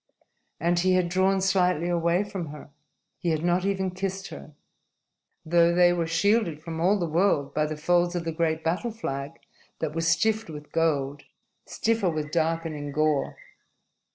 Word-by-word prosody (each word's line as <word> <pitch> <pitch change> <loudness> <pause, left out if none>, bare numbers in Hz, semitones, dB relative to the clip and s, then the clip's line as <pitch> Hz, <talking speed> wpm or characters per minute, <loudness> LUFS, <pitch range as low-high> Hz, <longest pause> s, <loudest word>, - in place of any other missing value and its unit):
And 170 +2 +1
he 185 +1 +3
had 180 -1 +2
drawn 190 +2 +2
slightly 180 -3 +2
away 170 +2 +1
from 195 -5 -5
her. 150 0 -11 0.5
He 175 - -1
had 160 -1 0
not 175 +1 +1
even 190 -1 0
kissed 190 +1 -4
her, 150 - -11 0.9
though 170 +1 +4
they 175 0 +5
were 170 -2 -1
shielded 170 0 +1
from 160 -1 -5
all 195 +4 +3
the 175 - -1
world 165 -3 +1
by 150 0 +1
the 155 0 -5
folds 175 +2 +1
of 175 - -2
the 165 - -1
great 160 -1 -1
battle 175 +9 -1
flag 140 -10 -5 0.4
that 155 -2 -3
was 165 0 -1
stiff 215 +5 +1
with 150 -1 -9
gold, 145 -3 0 0.4
stiffer 225 -4 0
with 155 -2 -3
darkening 160 -3 -1
gore. 155 -1 0
170 Hz, 165 wpm, -26 LUFS, 155-185 Hz, 0.9 s, they